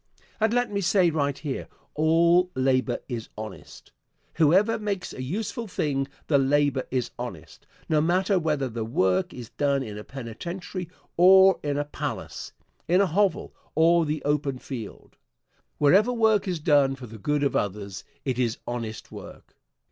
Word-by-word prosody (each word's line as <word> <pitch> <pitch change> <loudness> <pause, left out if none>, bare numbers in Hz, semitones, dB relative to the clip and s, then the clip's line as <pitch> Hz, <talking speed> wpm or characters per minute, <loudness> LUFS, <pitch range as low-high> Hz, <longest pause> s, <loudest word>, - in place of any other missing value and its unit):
And 220 0 +2
let 245 -1 +1
me 200 -1 -1
say 180 -1 +3
right 145 -3 -1
here, 145 -4 -5 0.3
all 170 +3 +4
labor 130 -2 +1
is 115 -4 -5
honest. 110 0 -9 0.4
Whoever 190 +9 +3
makes 200 -3 -3
a - - -7
useful 215 - -4
thing, 140 -7 -1 0.2
the 145 -3 +3
labor 140 -1 +2
is 125 -3 -2
honest, 90 -11 -8 0.2
no 155 -2 +2
matter 185 +4 +2
whether 150 -5 0
the 115 -2 -4
work 95 -4 +1
is 120 -3 -9
done 140 -2 0
in 105 -3 -7
a - - -8
penitentiary 170 - -6 0.3
or 190 +1 +7
in 145 -1 -2
a 145 - -1
palace; 145 - -5 0.4
in 180 +3 +4
a 200 - +5
hovel 190 +1 0 0.2
or 165 +1 +4
the 150 0 -2
open 145 -2 0
field. 120 -5 -9 0.6
Wherever 195 +11 +4
work 220 -4 +2
is 180 -3 -1
done 145 -3 +3
for 130 -2 -10
the 110 -1 -11
good 145 +6 0
of 140 - 0
others, 100 -1 -3 0.2
it 130 -2 -1
is 120 -2 0
honest 115 -3 -5
work. - - -12
145 Hz, 160 wpm, -26 LUFS, 130-180 Hz, 0.6 s, or